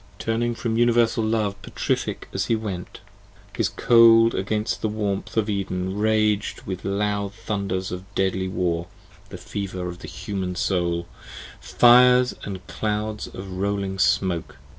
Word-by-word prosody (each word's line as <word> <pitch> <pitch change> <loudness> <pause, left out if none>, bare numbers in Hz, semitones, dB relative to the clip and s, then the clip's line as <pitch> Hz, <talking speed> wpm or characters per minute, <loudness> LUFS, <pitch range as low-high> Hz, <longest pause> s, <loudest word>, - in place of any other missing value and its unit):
Turning 115 +1 -1
from 115 -1 -2
Universal 120 -1 +3
Love 110 -2 -1
petrific - - -3
as - - -1
he 115 - +2
went, 100 -5 -6 0.5
His - - +1
cold 115 -1 +6
against 105 +3 -2
the 110 - 0
warmth 105 -1 -3
of 110 -1 +2
Eden 95 -2 -2
rag'd 110 0 +1
with 95 -1 -5
loud 100 0 -1
Thunders 100 -4 -3
of 90 +2 -7
deadly 95 -1 0
war 85 -2 -1 0.4
(the - - -8
fever 95 -3 -5
of 90 0 -7
the - - -9
human 95 -4 -4
soul) 85 -3 0 0.6
10 - - -14
Fires 125 +1 +6
and 95 -2 -6
clouds 105 0 -3
of 95 0 -9
rolling 100 -1 -2
smoke! 90 -8 +1
100 Hz, 140 wpm, -24 LUFS, 95-110 Hz, 0.6 s, cold